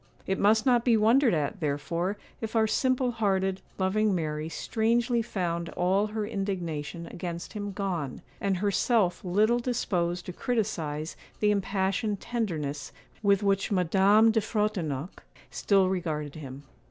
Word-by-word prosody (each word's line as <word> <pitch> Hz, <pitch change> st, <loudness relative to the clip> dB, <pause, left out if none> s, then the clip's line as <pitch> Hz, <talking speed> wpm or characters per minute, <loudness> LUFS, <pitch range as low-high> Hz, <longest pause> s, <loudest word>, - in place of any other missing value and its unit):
It 190 Hz, -, -1 dB
must 215 Hz, +2 st, +4 dB
not 245 Hz, -3 st, +4 dB
be 235 Hz, -3 st, +4 dB
wondered 230 Hz, +1 st, +4 dB
at, 150 Hz, +5 st, -2 dB
therefore, 165 Hz, +6 st, -1 dB, 0.2 s
if 225 Hz, 0 st, -4 dB
our 220 Hz, -1 st, +4 dB
simple 255 Hz, +2 st, +1 dB
hearted, 195 Hz, -4 st, 0 dB, 0.2 s
loving 200 Hz, +2 st, +2 dB
Mary 155 Hz, -2 st, -2 dB
strangely 235 Hz, +5 st, +1 dB
found 170 Hz, -6 st, -2 dB
all 190 Hz, +4 st, +2 dB
her 215 Hz, 0 st, -3 dB
indignation 175 Hz, -6 st, -3 dB
against 170 Hz, 0 st, -6 dB
him 205 Hz, -1 st, -4 dB
gone, 185 Hz, -9 st, -3 dB, 0.2 s
and 195 Hz, -2 st, 0 dB
herself 200 Hz, 0 st, +1 dB
little 210 Hz, +6 st, +2 dB
disposed 180 Hz, -8 st, -1 dB
to 180 Hz, -, -6 dB
criticise 165 Hz, -10 st, -2 dB, 0.2 s
the 210 Hz, -1 st, +3 dB
impassioned 195 Hz, +1 st, 0 dB
tenderness 155 Hz, -, -3 dB, 0.3 s
with 200 Hz, -1 st, +3 dB
which 195 Hz, +1 st, +1 dB
Madame 195 Hz, +4 st, +4 dB
de 220 Hz, 0 st, +2 dB
Frontignac 190 Hz, -, -2 dB, 0.3 s
still 195 Hz, -2 st, +3 dB
regarded 155 Hz, -6 st, -2 dB
him. 140 Hz, -2 st, -9 dB
195 Hz, 135 wpm, -28 LUFS, 170-220 Hz, 0.3 s, must